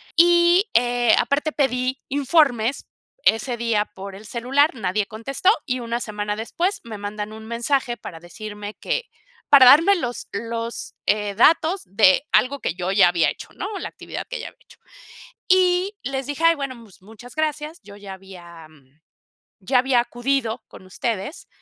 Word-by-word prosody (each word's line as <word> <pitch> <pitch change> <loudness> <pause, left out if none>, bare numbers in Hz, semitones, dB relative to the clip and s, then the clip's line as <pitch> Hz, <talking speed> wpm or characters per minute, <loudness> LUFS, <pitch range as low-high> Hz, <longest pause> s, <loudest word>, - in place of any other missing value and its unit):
y, 345 +3 +5
eh, 240 -1 +3
aparte 295 +2 0
pedí 255 -2 -1
informes 275 -4 +1 0.4
ese 235 +2 +2
día 230 -3 +1
por 195 -1 -10
el 210 - -12
celular, 265 +7 +1
nadie 205 -2 -1
contestó, 255 - -1 0.2
y 255 -1 -2
una 235 0 -3
semana 210 -2 -4
después 355 - -2
me 220 -2 -7
mandan 210 +1 -6
un 220 0 -10
mensaje 240 +1 -1
para 165 -6 -9
decirme 210 +3 -8
que - - -2 0.5
para 270 -3 +8
darme 330 +10 +7
los 245 -7 -5
los, 230 +2 -5
eh, 210 -1 0
datos 325 - +3
de 195 +4 +4
algo 280 +2 +2
que - - -2
yo 180 0 -2
ya 185 -3 +6
había 170 -2 +2
hecho, - - -10
¿no? - - -4
La - - -5
actividad - - -8
que - - -5
ya - - -6
había - - -14
hecho. - - -20 0.7
Y 370 +2 +3
les 265 +1 -3
dije: 290 +3 -4
"Ay 330 0 +6
bueno, 275 -3 -5
pues, 200 -5 -18
muchas 220 +5 -14
gracias, 310 +1 -3
yo 205 0 -13
ya 200 -1 -9
había 175 -4 -13 0.9
ya 250 +6 +2
había 255 -1 +2
acudido 240 -1 -2
con - - -14
ustedes, 230 - -4
240 Hz, 165 wpm, -22 LUFS, 210-285 Hz, 0.9 s, para